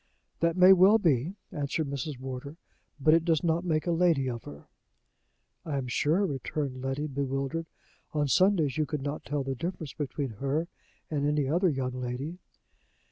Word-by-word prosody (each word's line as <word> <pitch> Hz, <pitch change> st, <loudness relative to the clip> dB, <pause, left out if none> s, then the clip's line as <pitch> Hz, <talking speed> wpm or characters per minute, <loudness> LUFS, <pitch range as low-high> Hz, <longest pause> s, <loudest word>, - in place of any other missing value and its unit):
"That 170 Hz, +1 st, +1 dB
may 185 Hz, +1 st, +9 dB
well 190 Hz, +4 st, +7 dB
be," 165 Hz, -, +1 dB, 0.2 s
answered 150 Hz, 0 st, -2 dB
Mrs. 140 Hz, 0 st, -4 dB
Wardour, 130 Hz, +3 st, -6 dB, 0.4 s
"but 155 Hz, +3 st, +5 dB
it 165 Hz, 0 st, +4 dB
does 165 Hz, 0 st, +1 dB
not 170 Hz, 0 st, +1 dB
make 155 Hz, -3 st, 0 dB
a 175 Hz, -, +1 dB
lady 165 Hz, -5 st, +3 dB
of 120 Hz, -2 st, -4 dB
her." 70 Hz, 0 st, -10 dB, 1.0 s
"I 150 Hz, -4 st, -3 dB
am 135 Hz, -, -2 dB
sure," 155 Hz, +10 st, +2 dB
returned 140 Hz, -3 st, -3 dB
Letty, 135 Hz, +3 st, -2 dB
bewildered, 140 Hz, +3 st, -2 dB, 0.4 s
"on 150 Hz, -1 st, 0 dB
Sundays 170 Hz, -4 st, +3 dB
you 155 Hz, -, +1 dB
could 145 Hz, -1 st, -3 dB
not 145 Hz, +1 st, -4 dB
tell 145 Hz, -1 st, -2 dB
the 135 Hz, 0 st, -2 dB
difference 165 Hz, +1 st, -5 dB
between 140 Hz, -2 st, -3 dB
her 145 Hz, +5 st, 0 dB, 0.4 s
and 145 Hz, -1 st, 0 dB
any 150 Hz, -2 st, +1 dB
other 175 Hz, +6 st, +3 dB
young 130 Hz, -4 st, -2 dB
lady." 130 Hz, +7 st, -4 dB
150 Hz, 170 wpm, -29 LUFS, 135-165 Hz, 1.0 s, may